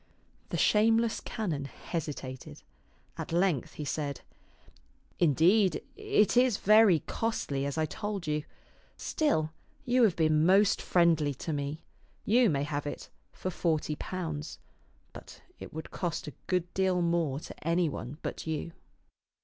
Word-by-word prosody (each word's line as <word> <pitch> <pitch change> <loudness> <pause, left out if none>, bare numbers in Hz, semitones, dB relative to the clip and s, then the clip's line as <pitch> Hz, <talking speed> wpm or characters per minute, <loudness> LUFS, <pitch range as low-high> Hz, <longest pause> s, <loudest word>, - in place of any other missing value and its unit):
The - - -2
shameless 225 +1 +3
canon 165 -11 -3
hesitated. 135 - -6 0.6
At - - -5
length 170 -5 +1
he 150 - -6
said, 140 -2 -3 1.0
Indeed, 175 - +4
it 210 +1 +2
is 245 -4 +4
very 210 -6 +5
costly, 140 -12 -2
as 140 - -4
I 160 - +2
told 205 +2 -4
you. 150 -1 -1 0.5
Still, 160 - 0 0.3
you 250 +1 +3
have 210 -7 +4
been 155 -1 +3
most 195 +4 +4
friendly 165 -5 +3
to 160 +5 -4
me. 145 +2 -4 0.4
You 235 +1 +4
may 140 -3 0
have 145 0 -3
it - - -6 0.2
for 185 - -4
forty 155 -3 0
pounds; 160 -3 -5 0.6
but - - -12 0.2
it - - -9
would 160 0 -7
cost 175 -3 -3
a 150 - -6
good 180 -1 -1
deal 185 -2 +1
more 170 -5 0
to 160 - -10
any 170 +1 +2
one 140 -1 -6
but - - -5
you." 160 +1 -3
165 Hz, 140 wpm, -30 LUFS, 150-195 Hz, 1.0 s, very